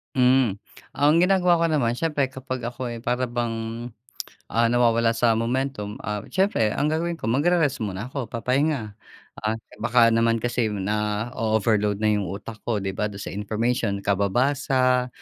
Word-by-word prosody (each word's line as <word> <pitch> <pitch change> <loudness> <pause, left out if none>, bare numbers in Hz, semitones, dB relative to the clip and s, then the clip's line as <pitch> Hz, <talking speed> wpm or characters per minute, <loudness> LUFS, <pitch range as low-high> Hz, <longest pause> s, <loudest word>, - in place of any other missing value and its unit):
Mm. 125 -5 +3 0.3
Ang 145 +1 +3
ginagawa 180 -1 +4
ko - - +4
naman, 120 -6 +1
siyempre 150 0 0
kapag 130 -2 -6
ako'y 120 -1 -5
para 125 +1 -1
bang, 115 -1 -3 0.7
ah, 115 0 +3
nawawala 115 -1 +3
sa 115 -1 +3
momentum, 115 -2 -2
ah, 105 -1 -2
siyempre 190 - +1
ang 140 +7 -1
gagawin 170 +2 -1
ko - - -12
magre-rest 155 0 +2
muna 105 +3 -4
ako, 130 -6 -4
papahinga. 125 0 -1 0.5
Ah, 110 +1 -1 0.2
baka 115 0 +4
naman 115 0 +3
kasi 120 0 -1
nao-overload 105 +1 0
na 105 +1 +1
yung 105 -2 -1
utak 110 +2 -7
ko, 115 - +1
'di 95 -1 -2
ba, 105 +2 -1
dun 100 - -9
sa - - -6
information 105 0 -1
kababasa, 125 +5 +1
115 Hz, 150 wpm, -24 LUFS, 105-130 Hz, 0.7 s, ginagawa